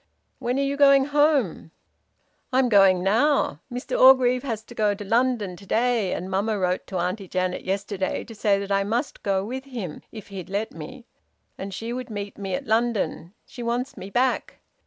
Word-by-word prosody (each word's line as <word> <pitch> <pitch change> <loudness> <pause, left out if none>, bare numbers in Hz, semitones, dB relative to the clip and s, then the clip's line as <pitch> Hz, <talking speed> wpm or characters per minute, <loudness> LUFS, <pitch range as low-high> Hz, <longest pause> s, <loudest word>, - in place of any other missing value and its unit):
"When 250 0 -1
are 275 - +1
you 280 0 -1
going 275 -1 +6
home?" 290 - +1 0.8
"I'm 255 -1 +3
going 195 -4 +5
now! 225 - +2
Mr 245 +1 -3
Orgreave 255 -1 +6
has 225 -5 -4
to 240 - -13
go 210 -3 +1
to 205 0 -8
London 230 -3 +1
to 195 - -14
day, 230 -4 +1
and 180 - -4
mamma 200 +3 0
wrote 180 -1 -1
to 190 - -4
Auntie 185 +3 -2
Janet 185 0 -2
yesterday 195 0 -2
to 230 - -11
say 205 -2 +2
that 200 0 -5
I 195 0 +2
must 235 +8 -2
go 195 -1 0
with 260 +4 -5
him, 225 - -6
if 215 -3 -10
he'd 190 -2 -7
let 205 +3 -2
me, 200 +11 -9 0.5
and 195 +1 -6
she 225 +5 -5
would 250 0 -5
meet 205 -2 -5
me 195 -2 -2
at 275 - -5
London. 220 -6 -1
She 245 - -10
wants 240 +3 -2
me 190 - -8
back. 250 +4 0
220 Hz, 190 wpm, -24 LUFS, 195-250 Hz, 0.8 s, going